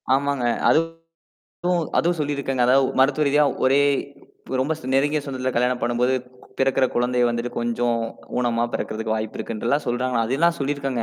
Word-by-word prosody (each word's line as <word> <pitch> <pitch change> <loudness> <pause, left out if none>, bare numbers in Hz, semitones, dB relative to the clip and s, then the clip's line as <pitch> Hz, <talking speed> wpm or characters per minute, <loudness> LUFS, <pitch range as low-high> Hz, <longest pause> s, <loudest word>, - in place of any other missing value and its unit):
ஆமாங்க. 140 -2 -1 0.2
அதுவும் 165 0 0 0.9
அதுவும் 175 0 +1
சொல்லியிருக்காங்க. 140 -3 -1
அதாவது, 130 +2 +4
மருத்துவ 145 +3 +3
ரீதியா 150 +1 +4 0.2
ஒரே 135 +2 +4 0.6
இப்ப 130 - -3
ரொம்ப 145 +5 0
சொ 130 - -11
நெருங்கிய 145 +2 +2
சொந்தத்தில 130 -2 -3
கல்யாணம் 125 +1 +1
பண்ணும்போது 120 +2 +1 0.4
பிறக்குற 135 0 +2
குழந்தைய 125 0 +2
வந்துட்டு 120 +1 -2
கொஞ்சம் 120 0 0 0.4
ஊனமா 120 -1 +1
பிறக்கறதுக்கு 110 0 -3
வாய்ப்பு 110 0 -4
இருக்குன்றெல்லாம் 120 +6 -1
சொல்றாங்கா. 125 -1 0
அதெல்லாம் 165 +7 +2
சொல்லியிருக்கங்க. 135 -3 -2
130 Hz, 140 wpm, -23 LUFS, 120-140 Hz, 0.9 s, அதாவது